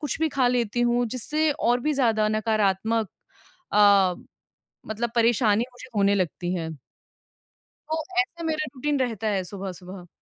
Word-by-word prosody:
कुछ 295 Hz, 0 st, -3 dB
भी 320 Hz, -, +2 dB
ख़ा 265 Hz, -3 st, +1 dB
लेती 240 Hz, -1 st, 0 dB
हूँ 240 Hz, 0 st, +2 dB
जिससे 300 Hz, +7 st, -1 dB
और 245 Hz, -2 st, +1 dB
भी 300 Hz, +4 st, 0 dB
ज़्यादा 225 Hz, -5 st, +2 dB
नकारात्मक 215 Hz, 0 st, 0 dB, 0.6 s
अ, 200 Hz, -3 st, +5 dB, 0.7 s
मतलब 220 Hz, +2 st, -2 dB
परेशानी 230 Hz, -2 st, +3 dB
मुझे 255 Hz, +1 st, -12 dB
होने 200 Hz, -1 st, +3 dB
लगती 180 Hz, 0 st, -2 dB
है। 165 Hz, -3 st, -3 dB, 1.2 s
तो 320 Hz, 0 st, -1 dB, 0.2 s
ऐसे 340 Hz, -3 st, -4 dB
मेरा 310 Hz, -1 st, -1 dB
रूटीन 285 Hz, +2 st, -1 dB
रहता 225 Hz, -4 st, -2 dB
है 190 Hz, -, -1 dB
सुबह-सुबह। 185 Hz, -1 st, -8 dB
225 Hz, 140 wpm, -25 LUFS, 200-255 Hz, 1.2 s, अ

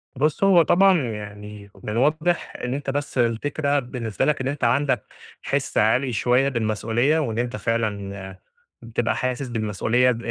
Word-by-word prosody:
بُصّ، 150 Hz, +6 st, 0 dB
هو 190 Hz, -3 st, +6 dB
طبعًا 185 Hz, +2 st, +4 dB
يعني 105 Hz, -1 st, -9 dB
من -, -, -5 dB
الواضح 155 Hz, +9 st, 0 dB
إن 125 Hz, -, -2 dB
أنت 140 Hz, 0 st, -4 dB
بس 140 Hz, 0 st, -3 dB
الفكرة 140 Hz, +5 st, +1 dB
بالنسبة 120 Hz, -4 st, -3 dB
لك 150 Hz, -3 st, +1 dB
إن 130 Hz, -, -2 dB
أنت 140 Hz, +1 st, -4 dB
عندك 130 Hz, +4 st, +2 dB, 0.4 s
حِس -, -, -2 dB
عالي 120 Hz, +4 st, +2 dB
شوية 125 Hz, +4 st, +2 dB
بالمسؤولية 115 Hz, +5 st, +1 dB
وإن 115 Hz, -7 st, -2 dB
أنت 120 Hz, -1 st, -2 dB
فعلًا 100 Hz, -4 st, -3 dB, 0.4 s
بتبقى 115 Hz, 0 st, -1 dB
حاسس 130 Hz, +1 st, -2 dB
بالمسؤولية 115 Hz, +2 st, +1 dB
ب 115 Hz, -, -3 dB
120 Hz, 150 wpm, -23 LUFS, 110-140 Hz, 0.4 s, هو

